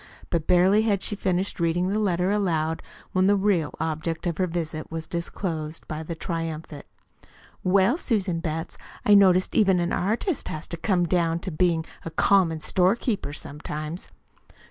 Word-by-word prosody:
But 165 -3 -1
barely 185 +4 +5
had 205 -3 +1
she 205 - +2
finished 190 -1 -1
reading 170 +2 +1
the 210 +2 0
letter 185 -2 +1
aloud, 165 -6 0 0.3
when 185 0 +3
the 205 - +5
real 190 -8 +1
object 160 +1 -2
of 170 -1 -2
her 185 - +2
visit 160 -2 -4
was 160 -1 -5
disclosed 165 -2 -4
by 155 0 -4
the 165 +1 -5
triumphant: 160 -3 -5 0.8
"Well, 195 - +3
Susan 200 - 0
Betts, 165 -1 -4 0.3
I 210 - +6
notice 185 -2 +6
even 190 -4 +3
an 175 0 -1
artist 230 - -1
has 155 +1 -4
to 170 - -4
come 180 +1 +1
down 165 -1 +1
to 185 - -4
bein' 165 0 +1 0.2
a - - -4
'common 165 -1 +3
storekeeper' 190 - +1
sometimes." 150 +3 -6
175 Hz, 160 wpm, -25 LUFS, 160-195 Hz, 0.8 s, I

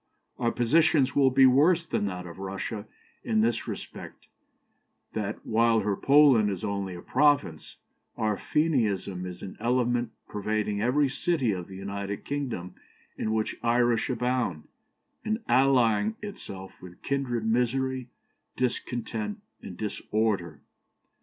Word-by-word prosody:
Our 120 -2 +1
position 150 +4 +4
will 135 -2 +5
be 135 +1 +5
worse 155 +7 +5
than 105 - -1
that 90 -2 -5
of 85 +1 -10
Russia 100 +3 -5 0.4
in 110 -1 +2
this 115 +1 0
respect, - - -8 0.9
that, 105 -1 -4
while 115 0 +3
her 105 -1 0
Poland 135 -5 +5
is 95 -1 -4
only 100 -3 -3
a 85 - -9
province, 140 - +1 0.4
our 105 -1 +1
Fenianism 105 - 0
is 90 0 -8
an 95 - -8
element 120 +1 +1 0.2
pervading 105 0 -2
every 135 +5 +3
city 135 -3 0
of 90 -3 -4
the 95 - -10
United 100 +1 -5
Kingdom 130 -11 -4 0.4
in 110 - -2
which 110 0 -1
Irish 120 -1 +2
abound, 125 -9 -1 0.6
and 220 +1 -2
allying 130 - +3
itself 95 - -8
with 90 -1 -13
kindred 125 -5 -1
misery, 125 +2 0 0.5
discontent, 130 - -2 0.2
and 90 - -9
disorder. 105 -6 -2
115 Hz, 125 wpm, -27 LUFS, 100-130 Hz, 0.9 s, will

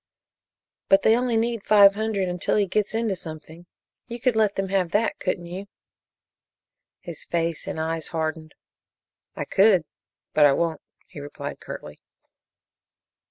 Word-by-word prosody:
"But 195 0 +5
they 220 - +5
only 245 -1 0
need 230 -1 -1
five 200 -2 +7
hundred 210 -2 -1
until 180 -1 -1
he 205 - +3
gets 210 +3 -1
into 225 -3 0
something. 160 +1 -10 0.4
You 235 0 -6
could 250 -1 +1
let 215 -2 +2
them 195 -1 -2
have 190 -3 +1
that, 220 +2 +1
couldn't 180 -2 -2
you?" 185 +4 -7 1.3
His 170 -3 -8
face 165 -1 -2
and - - -4
eyes 160 0 -2
hardened. 160 -1 -4 0.8
"I - - -4
could, 190 -4 +4 0.5
but 150 -1 +6
I 140 - +3
won't," 165 0 -1 0.2
he 170 - -11
replied 145 0 -7
curtly. - - -9
190 Hz, 145 wpm, -24 LUFS, 165-215 Hz, 1.3 s, five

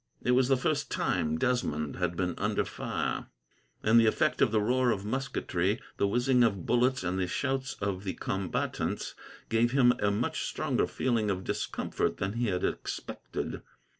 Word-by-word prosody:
It 125 - +2
was 125 0 +4
the 135 0 +4
first 125 - 0
time 80 0 0
Desmond 80 - 0
had 90 -1 -1
been 90 -1 0
under - - +1
fire, - - -3 0.6
and 110 +2 +6
the 115 - +5
effect 155 +7 +2
of 125 - +4
the 110 - +3
roar 125 +4 +2
of 100 -3 0
musketry, 110 -5 -1 0.2
the 100 - +2
whizzing 125 +3 +3
of 100 -6 +1
bullets, 125 0 +2
and 90 +1 -1
the 90 - 0
shouts 135 +6 -1
of 100 -1 -3
the 95 - -3
combatants, 95 -2 -2 0.4
gave 115 +2 +2
him 125 -3 +6
a 100 - +2
much 100 - -1
stronger - - 0
feeling 115 -5 0
of 95 -1 -1
discomfort - - -2
than 95 +1 -2
he 120 +1 0
had 90 -3 -1
expected. - - -4
110 Hz, 170 wpm, -30 LUFS, 95-125 Hz, 0.6 s, and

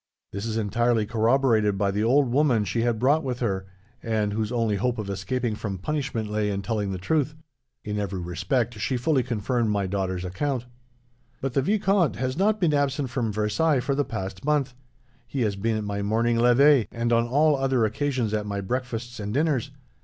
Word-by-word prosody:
This 100 +3 -4
is 110 0 -2
entirely 115 +1 +1
corroborated 115 -2 +2
by 100 0 +1
the 105 +2 -1
old 135 +4 +4
woman 125 -6 +3
she 110 +5 -1
had 120 -1 +1
brought 140 +7 +3
with 125 -2 -2
her, 95 -5 -2 0.3
and 110 -2 -1
whose 110 +1 -2
only 115 -4 +1
hope 125 +4 0
of 105 -2 -4
escaping 115 +5 -2
from 105 -2 -4
punishment 130 0 -2
lay 105 0 -1
in 100 -1 -2
telling 105 -2 -1
the 95 - -3
truth. 150 - 0 0.5
In 105 -1 -3
every 100 -2 -3
respect, 95 +7 -1
she 125 +4 0
fully 130 +2 +2
confirmed 120 0 -1
my 100 -2 0
daughter's 95 -1 -2
account.' 125 +7 -2 0.7
"'But 135 -1 -3
the 135 - +2
vicomte 195 - +2
has 130 +2 -2
not 210 +4 +2
been 170 -6 +2
absent 140 -2 0
from 120 -4 -1
Versailles, 110 +9 +1
for 140 +3 -1
the 145 +1 +1
past 95 -6 -6
month. 145 -3 +1 0.5
He 135 - -3
has 105 -4 +1
been 110 +3 -1
at 110 - -3
my 100 0 -3
morning 115 +3 +1
levee, 125 0 +5
and 120 0 -1
on 115 0 +3
all 150 +4 +3
other 135 -4 +1
occasions 125 -1 -1
at 105 -1 -1
my 100 -1 -3
breakfasts 120 +2 -4
and 105 0 -4
dinners. 140 -1 +1
115 Hz, 195 wpm, -25 LUFS, 105-135 Hz, 0.7 s, levee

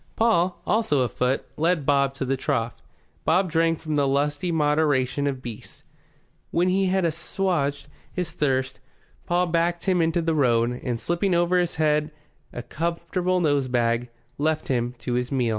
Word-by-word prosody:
Paul, 185 -6 +1
also 205 - +2
afoot, 125 +2 0
led 165 -2 +1
Bob 140 -1 +2
to 135 - -3
the 135 +1 0
trough. 125 -4 -2 0.4
Bob 185 -2 +2
drank 165 0 +1
with 155 -1 -1
the 140 -1 +2
lusty 145 +5 0
moderation 145 -3 +1
of 135 -2 -3
beasts. 115 -3 -9 0.7
When 175 +2 +1
he 190 +1 +2
had 190 -1 +1
assuaged 165 -3 -1 0.2
his 180 -3 -3
thirst 135 -2 -1 0.5
Paul 175 +1 +2
backed 170 0 0
him 185 -3 +2
into 165 +1 +1
the 165 0 +1
road 125 -4 +2
and, 120 -3 -2
slinging 175 - 0
over 175 +1 +3
his 175 -1 -1
head 150 0 +1 0.4
a 120 - -6
comforting 170 +3 -1
nosebag, 125 -5 +1 0.3
left 155 +1 0
him 120 -1 0
to 120 +1 -4
his 125 0 -1
meal. 125 -4 +1
150 Hz, 160 wpm, -24 LUFS, 130-175 Hz, 0.7 s, over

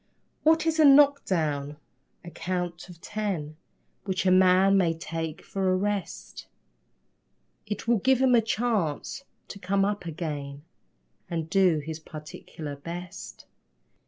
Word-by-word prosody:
What 320 +1 +3
is 325 -1 0
a - - +7
knock 285 0 +6
down? 150 -5 -1 0.5
A 170 - -8
count 175 +1 -4
of 175 -2 -12
ten 190 -8 -4 0.5
Which 190 -1 -2
a 185 - +4
man 185 +1 +5
may 175 -4 +2
take 165 -1 -5
for 190 -1 -1
a - - +3
rest. 205 0 -4 1.2
It 210 +2 -5
will 235 -2 +3
give 265 +5 +3
him 260 -1 +4
a 235 - +6
chance 225 - -2 0.3
to 200 - -8
come 195 +1 +1
up 205 -3 -3
again 145 -3 -5 0.7
And 165 -1 -4
do 185 -4 +4
his 160 0 -5
particular 150 -1 -9
best. 170 +5 -8
185 Hz, 135 wpm, -27 LUFS, 160-205 Hz, 1.2 s, a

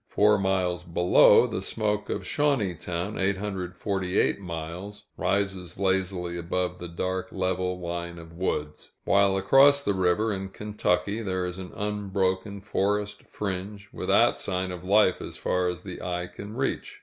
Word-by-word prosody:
Four 105 0 +4
miles 90 -3 0
below, 90 +1 +5
the - - -3
smoke 105 -1 -1
of - - -2
Shawneetown 100 - -1
(848 95 -1 -1
miles) 90 +4 -6
rises 95 -3 -1
lazily 95 -2 0
above 90 +1 -2
the 85 - -6
dark 95 +2 -3
level 95 -1 -1
line 85 0 -4
of 80 0 -11
woods; 75 -4 -3 0.2
while 100 -1 +4
across 135 +9 +6
the 100 - +1
river, 95 +4 +1
in 95 0 -4
Kentucky, 105 +1 -1
there 95 -3 -1
is 90 +1 -5
an 90 -1 -7
unbroken 100 -1 -1
forest 105 0 -1
fringe, 100 0 -5
without - - +3
sign 95 0 -2
of 90 -1 -7
life 100 -1 +4
as - - -7
far 90 0 0
as 90 -2 -5
the - - -7
eye 90 -1 -2
can 100 +4 -9
reach. 135 +1 -2
95 Hz, 145 wpm, -27 LUFS, 90-100 Hz, 0.2 s, across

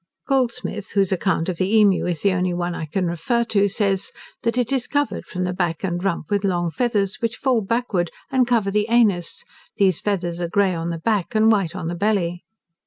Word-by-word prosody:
Goldsmith, 250 -5 -1
whose 195 -2 +2
account 185 -3 0
of 180 -3 -2
the 190 +4 +1
emu 200 -4 +4
is 170 -4 -2
the 200 - +4
only 180 -1 0
one 175 0 -2
I 165 - -4
can 180 +5 -1
refer 175 +8 0
to, 205 -3 +2
says, 200 -1 -1 0.3
"that 230 +1 -1
it 245 -1 0
is 265 -3 0
covered 290 -1 -1
from 180 - -3
the 180 0 -1
back 175 -3 -2
and 175 -1 -2
rump 180 -4 -2
with 205 0 +1
long 175 -3 0
feathers, 210 -4 0
which 230 +1 -1
fall 255 -4 +1
backward, 205 -5 -1 0.2
and 260 -2 +3
cover 225 -5 +1
the 210 +1 +1
anus; 210 -8 +2 0.3
these 190 -5 +3
feathers 175 -4 -2
are 170 - -2
grey 195 +1 +2
on 165 0 -3
the 170 - -3
back, 210 +4 -1
and 220 +1 +5
white 190 -5 +1
on 175 -4 -4
the 170 - -2
belly." 175 -2 0
195 Hz, 215 wpm, -22 LUFS, 175-225 Hz, 0.3 s, and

